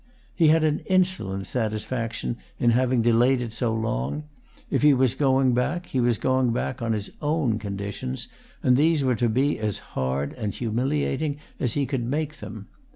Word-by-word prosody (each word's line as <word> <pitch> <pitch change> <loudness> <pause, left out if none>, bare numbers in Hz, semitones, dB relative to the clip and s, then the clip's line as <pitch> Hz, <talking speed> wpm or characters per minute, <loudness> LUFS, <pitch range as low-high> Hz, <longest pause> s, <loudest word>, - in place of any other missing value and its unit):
He 165 - +4
had 160 +1 +5
an 155 -1 +2
insolent 180 - +1
satisfaction 110 - -2 0.2
in 120 - +3
having 125 0 +2
delayed 120 +3 +4
it 120 -3 -4
so 115 0 0
long; 110 - -2 0.5
if - - +1
he 145 -1 +6
was 130 -2 +3
going 135 -2 +3
back 155 +9 0
he 130 - -2
was 120 -2 +2
going 130 0 +2
back 125 +2 -2
on 115 -1 0
his 105 -2 -4
own 145 -7 +1
conditions, 100 - -4 0.4
and 125 0 +4
these 155 0 +3
were 130 -1 +2
to 120 +1 +1
be 135 +5 +1
as 105 -3 -1 0.2
hard 65 +2 -1
and 105 -5 -4
humiliating 135 +5 -1 0.2
as 120 -4 0
he 145 -1 +1
could 130 -2 -2
make 150 +4 -2
them. 105 -2 -8
125 Hz, 175 wpm, -25 LUFS, 110-140 Hz, 0.5 s, he